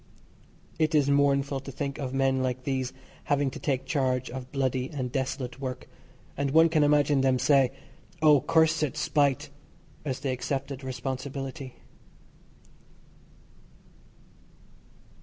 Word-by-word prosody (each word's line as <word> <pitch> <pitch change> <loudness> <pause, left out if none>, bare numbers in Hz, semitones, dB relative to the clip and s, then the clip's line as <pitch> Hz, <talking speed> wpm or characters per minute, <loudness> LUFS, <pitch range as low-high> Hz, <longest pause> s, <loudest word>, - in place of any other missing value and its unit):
It 155 0 +2
is 140 -2 +3
mournful 140 -1 +2
to 135 +1 -8
think 140 +1 -4
of 135 -3 -3
men 135 0 +1
like 130 0 -2
these 130 -2 -1 0.3
having 145 -2 +1
to - - -8
take 135 -3 -1
charge 130 -6 0
of 130 0 -7
bloody 130 -2 -1
and 130 -5 -4
desolate 130 -1 -3
work, 130 -2 -5 0.5
and 140 0 -1
one 160 +4 +5
can 155 -2 +3
imagine 145 -1 +3
them 130 -1 +3
say, 135 -1 +4 0.5
"Oh! 150 -3 +6
cursed 155 -3 +2
spite," 145 -1 +1 0.5
as 135 -3 -3
they 140 -2 -1
accepted 135 +1 -3
responsibility. 130 +1 -5
135 Hz, 120 wpm, -27 LUFS, 130-145 Hz, 0.5 s, Oh